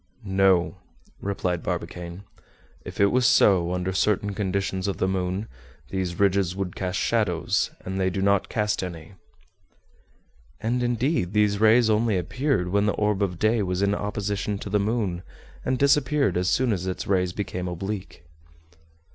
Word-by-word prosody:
"No," 95 -1 +2 0.4
replied 90 -3 -2
Barbicane; 90 +2 -5 0.6
"if - - -9
it 100 0 +4
was 125 0 +2
so, 95 -7 +4
under 90 +1 -2
certain 100 +1 +1
conditions 95 -1 -2
of 100 - -2
the 95 - +1
moon, 95 +2 -2 0.4
these 95 -3 -3
ridges 95 -2 +2
would 95 -2 -4
cast 95 -1 -2
shadows, - - +1 0.2
and 95 +1 -3
they 95 - +2
do 95 - -3
not 100 0 +2
cast 105 -1 0
any." 85 -1 -7 1.5
And 120 +3 -1
indeed, 120 - 0
these 105 -1 +2
rays 110 +2 +5
only 110 -1 +2
appeared 90 - -1
when 100 +2 +2
the 105 - +2
orb 105 -1 0
of 90 -3 -1
day 110 +3 +2
was 90 0 -1
in 100 0 +2
opposition 105 0 -2
to 100 - -7
the 105 - +3
moon, 100 -4 -1 0.4
and 130 0 0
disappeared 140 - +2
as 90 +1 +1
soon 125 +3 +2
as 95 -1 -3
its 90 - -3
rays 90 -2 +1
became 90 -2 -4
oblique. 95 +1 -5
100 Hz, 155 wpm, -25 LUFS, 90-105 Hz, 1.5 s, rays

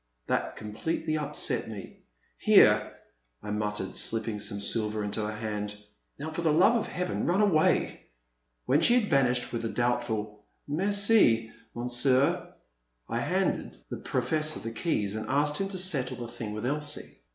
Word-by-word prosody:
That - - -1
completely 135 +9 -3
upset 150 -1 -1
me. 105 -3 -9 0.4
Here/* - - +5 0.5
I 105 - -5
mut 105 0 -1
tered, 95 -2 -3
slipping 115 -2 0
some 100 0 -2
silver 105 0 -1
into 105 +1 -2
her 105 - -2
hand, 105 -1 -4 0.4
now 155 +3 -5
for 160 - -3
the 160 -2 +2
love 180 +9 +5
of 230 - 0
Heaven 180 0 -2
run 180 +3 +2
away! 190 -7 +2 0.3
" - - -49
When - - +3
she 240 - +5
had 210 -6 -3
vanished 125 -2 +2
with 115 -1 -2
a 115 - -1
doubtful 110 -4 -2 0.2
Merci, 190 - +3 0.2
Monsieur," 125 +3 +1 0.6
I - - -2
handed - - -1
the - - -3
Professor 155 -1 0
the 115 - -5
keys 110 - -1
and 110 0 -5
asked 145 +2 +1
him 195 - -1
to 195 - -5
settle 140 -9 0
the 120 - -6
thing 115 -2 -6
with 110 +2 -4
Elsie. 150 +2 -3
120 Hz, 165 wpm, -28 LUFS, 110-155 Hz, 0.6 s, Here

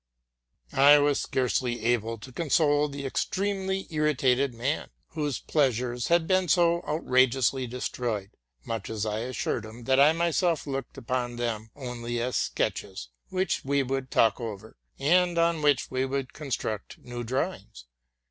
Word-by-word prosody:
I 145 +2 +7
was 145 -1 +2
scarcely 125 -2 -1
able 115 -1 +1
to 130 +5 -11
console 150 0 +2
the 140 -1 -6
extremely 190 +6 -1
irritated 140 -4 +2
man, 125 +6 -2 0.2
whose 150 -6 -2
pleasures 125 -4 0
had 170 -1 +3
been 185 +1 +2
so 170 +1 +3
outrageously 130 -3 +2
destroyed, 115 -4 -3 0.3
much 115 -3 -4
as 110 -1 -2
I 105 0 -2
assured 125 +2 -2
him 110 +2 -10
that 130 +3 +3
I 145 +2 +7
myself 170 0 +1
looked 135 -3 -5
upon 120 0 -2
them 115 -2 -3
only 120 -3 -4
as 125 +2 -2
sketches, 65 - -2 0.2
which 185 -1 -1
we 140 0 +1
would 135 0 -3
talk 110 -3 +3
over, 110 -1 -7 0.2
and 175 +4 +3
on 170 -1 +2
which 145 -3 +2
we 130 0 0
would 135 -1 -3
construct 115 -7 -4
new 120 0 -7
drawings. 120 - -3
130 Hz, 145 wpm, -27 LUFS, 120-150 Hz, 0.3 s, I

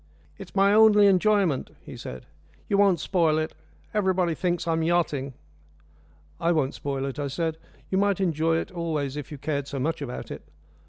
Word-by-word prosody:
"It's - - -11
my 200 +1 +4
only 210 -1 +7
enjoyment," 195 -6 +3
he - - -9
said. 65 0 -8 0.4
"You 200 - +1
won't 195 -4 +4
spoil 165 -3 +2
it 155 0 -2 0.4
everybody 190 -4 +1
thinks 175 0 -1
I'm 165 0 +1
yachting." 155 -6 0 1.0
"I 170 - +2
won't 145 -4 0
spoil 135 -1 -3
it," 135 +1 -5
I 145 - -1
said. 160 +3 -2 0.3
"You 190 - +2
might 200 -1 +2
enjoy 165 -3 +1
it - - -4
always 155 -6 -2
if 150 0 -6
you 150 - -6
cared 140 0 -3
so 140 - -5
much 155 +4 -1
about 125 -3 -6
it." - - -6
165 Hz, 175 wpm, -26 LUFS, 145-190 Hz, 1.0 s, only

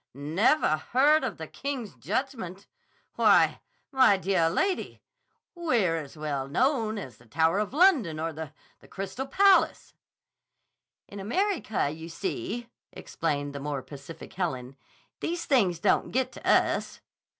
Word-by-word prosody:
_ - - -11
Nevah 155 - +2
heard 295 +5 +5
of - - -3
the - - -6
King's 265 -7 -5
Judgment? 210 -5 -4 0.5
Why, - - +4 0.3
my 260 -7 +5
deah 185 -3 +1
lady, 375 - -1 0.5
we're 240 - +1
as 155 -1 -8
well 145 -3 -3
known 225 - +1
as 130 - -8
the 115 - -21
Tower 160 - +2
of 210 - -2
London 280 - +3
or 165 0 -2
the—the 155 -1 -11
Crystal 195 +7 -5
Palace." 390 +6 +3 1.1
"In 200 - -9
America, 225 - -1
you 160 +2 -8
see," 340 - -4 0.2
explained 145 -3 -3
the 140 - -5
more 140 -2 -4
pacific 145 +3 -11
Helen, 135 -8 -3 0.4
"these 340 0 -3
things 200 - +2
don't 165 - +1
get 260 +1 0
to - - -5
us." - - +2
195 Hz, 135 wpm, -27 LUFS, -, 1.1 s, heard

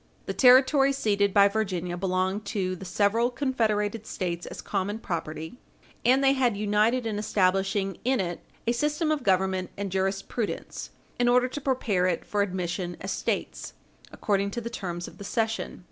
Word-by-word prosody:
The - - -3
territory 270 +2 +6
ceded 205 -6 +1
by 200 +1 +6
Virginia 185 -4 -2
belonged 185 +2 -1
to 185 -3 -2
the 190 - -9
several 210 +6 +2
confederated 225 -5 -1
States 175 -2 -3
as - - -8
common 205 +1 -2
property, 160 +1 -5 0.4
and 260 +3 +4
they 270 0 +5
had 250 -6 +1
united 215 +4 +2
in 215 -2 -2
establishing 195 -1 +1
in 260 0 +2
it 175 -2 -2 0.3
a 235 - +2
system 300 +6 0
of 305 -2 0
government 190 -3 +1
and 200 -1 -3
jurisprudence 195 +4 -3 0.3
in 245 - +3
order 250 +1 +4
to 290 - -6
prepare 225 -9 +1
it 175 -2 -1
for 205 - 0
admission 180 -2 -2
as 190 - -4
States - - -3 0.4
according 200 -1 0
to 220 - -4
the 235 0 -6
terms 175 -6 -4
of - - -13
the - - -7
cession. 225 +2 -2
205 Hz, 165 wpm, -27 LUFS, 185-240 Hz, 0.4 s, territory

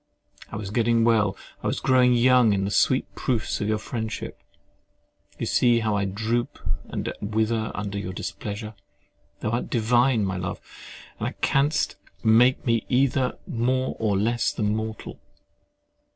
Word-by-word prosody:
I - - -6
was 100 -2 -5
getting 115 0 +2
well, 110 -4 +2 0.2
I - - -2
was - - -1
growing 125 -1 +4
young 125 -2 +5
in 95 -1 0
the 100 - -2
sweet 130 +5 +2
proofs 120 -4 -1
of 105 - -1
your 110 0 +1
friendship: 110 0 -5 1.0
you - - -3
see 120 -1 +3
how 110 -2 0
I 100 -1 0
droop 110 +5 -2 0.3
and - - -4
wither 110 +1 0
under 100 -1 -3
your 95 -2 -4
displeasure! 105 +3 -6 0.7
Thou 110 - -1
art 120 - -2
divine, 120 -1 +2
my 95 -1 -2
love, 95 0 -4 0.6
and - - -4
canst 145 +2 +1 0.3
make 120 +3 +4
me 115 -2 +2
either 130 0 +1
more 130 +2 0
or 105 -3 +1
less 115 +4 +1
than 105 -1 -1
mortal. 110 0 -5
115 Hz, 150 wpm, -25 LUFS, 105-125 Hz, 1.0 s, young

